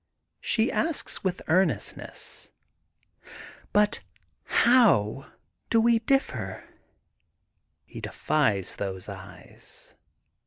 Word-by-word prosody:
She 230 +1 +1
asks 320 -2 -1
with 185 -2 -2
earnestness: 160 - -1 0.5
— - - -17
But 210 0 +3 0.5
how 170 - +3 0.4
do 230 - +4
we 230 0 +4
diflferf 270 +4 -1 1.2
He - - -10
defies 110 -12 0
those 95 -2 -4
eyes. - - -11
190 Hz, 80 wpm, -27 LUFS, -, 1.2 s, do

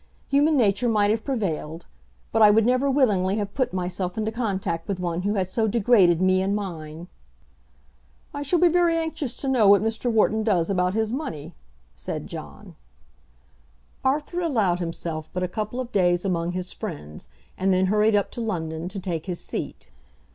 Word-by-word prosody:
Human 290 +2 +3
nature 230 0 +2
might 210 -2 +3
have 220 0 -1
prevailed. 170 - -3 0.5
But 225 - +1
I 210 - +9
would 215 +1 +4
never 255 +3 +2
willingly 205 -9 +2
have 205 -2 -3
put 260 - 0
myself 180 0 -3
into 220 0 -1
contact 195 -7 -2
with 195 -2 -3
one 175 -1 -2
who 205 +3 -1
had 190 -2 0
so 220 +4 0
degraded 200 -6 +4
me 185 0 +3
and 195 +2 0
mine." 165 -4 -6 1.3
"I 285 - -4
shall 290 +5 +1
be 350 +1 +5
very 340 -1 +3
anxious 320 -6 -3
to 275 - -4
know 250 -6 +3
what 200 +1 +6
Mr. 225 +2 -1
Wharton 220 0 +2
does 200 -5 +1
about 180 0 +1
his 220 0 0
money," 250 - -5 0.4
said - - -5
John. - - -10 1.3
Arthur 295 +6 0
allowed 215 - +1
himself 165 -2 -4
but 180 - -2
a - - 0
couple 215 +6 -4
of 250 -1 -5
days 175 -1 +2
among 175 -2 -1
his 180 0 -4
friends, 145 - -8 0.3
and 190 +1 +1
then 185 0 +3
hurried 210 +2 +3
up 205 - +1
to 240 - -5
London 165 -6 -3
to 195 +1 -6
take 175 -3 -4
his 180 -2 -3
seat. - - -6
205 Hz, 180 wpm, -24 LUFS, 180-235 Hz, 1.3 s, I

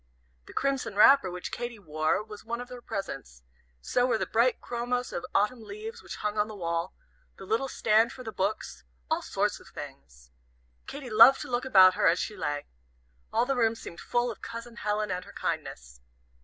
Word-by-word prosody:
The - - -11
crimson 270 -6 -1
wrapper 215 -1 +7
which 180 0 -6
Katy 240 -1 -4
wore 155 0 0
was 210 -1 -11
one 235 +2 -4
of 245 0 -7
her 250 -1 -9
presents, 135 - -6 0.4
so 245 - +1
were 245 - +2
the - - -1
bright 235 +3 +2
chromos 245 +1 -3
of 175 - -3
Autumn 210 +4 +2
leaves 440 - -8
which - - -8
hung 210 0 -2
on 210 - +2
the 215 - -8
wall, 170 -1 -2 0.4
the 195 - -10
little 225 +7 0
stand 225 -2 +3
for 255 - -9
the 225 - -5
books 200 - -3 0.3
all - - +2
sorts - - -1
of - - -17
things. 60 -3 -11 0.6
Katy 275 -4 -7
loved 230 +5 +8
to - - -7
look 245 +2 0
about 190 -7 +7
her - - +2
as 170 - +4
she 210 - -3
lay. 145 -6 -3 0.7
All - - +2
the 275 +1 0
room 230 -2 +2
seemed 170 -6 -9
full 240 0 0
of 220 - -11
Cousin 230 0 -8
Helen 210 -2 -1
and 180 0 -2
her - - -14
kindness. - - -4
220 Hz, 195 wpm, -28 LUFS, 185-245 Hz, 0.7 s, loved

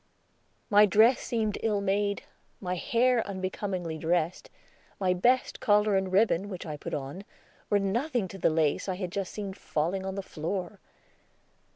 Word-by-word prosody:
My 210 +1 +7
dress 225 +6 +5
seemed 220 -4 -1
ill 215 -2 +1
made; 200 +1 0 0.4
my 180 -2 -3
hair 235 +6 +2
unbecomingly 185 -3 -4
dressed; 170 +1 0 0.5
my 185 -2 +2
best 245 +8 +2
collar 210 -1 +3
and 190 -1 0
ribbon, 200 -1 +2
which 185 -3 -6
I 155 -2 -4
put 145 - -5
on, 145 +7 -6 0.5
were 205 - +4
nothing 230 +3 0
to 195 - -9
the - - +3
lace 155 +3 +1
I 185 - -1
had 180 -2 -4
just 195 -1 -3
seen 200 -2 -5
falling 185 0 -2
on 190 0 -4
the 195 - -4
floor. 180 +3 -4
195 Hz, 160 wpm, -28 LUFS, 180-210 Hz, 0.5 s, My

